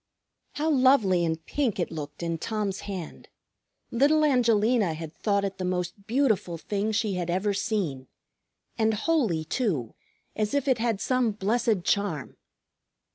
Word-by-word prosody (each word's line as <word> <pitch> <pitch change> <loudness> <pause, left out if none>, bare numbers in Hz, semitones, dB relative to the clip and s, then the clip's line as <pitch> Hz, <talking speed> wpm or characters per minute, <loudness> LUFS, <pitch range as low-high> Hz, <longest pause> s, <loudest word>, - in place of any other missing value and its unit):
How 305 +2 -1
lovely 255 - +4
and 160 -1 -2
pink 260 -9 -1
it 175 - -1
looked 150 0 -6
in 165 -1 -2
Tom's 210 -1 -2
hand! 185 -5 -7 0.6
Little 295 +5 +4
Angelina 230 - +3
had 160 0 -7
thought 200 -2 0
it 195 0 -5
the - - -2
most 180 +2 -3
beautiful 225 -9 +1
thing 205 +5 -2
she 215 -1 0
had 180 -2 -3
ever 190 +4 +1
seen, 190 - -2 0.7
and 220 0 +3
holy, 220 - +1
too, 155 - -1 0.4
as 215 +4 -1
if 285 -1 0
it 255 -3 +3
had 225 -3 0
some 255 0 +1
blessed 210 -1 0
charm. 185 -10 -1
205 Hz, 145 wpm, -27 LUFS, 175-235 Hz, 0.7 s, lovely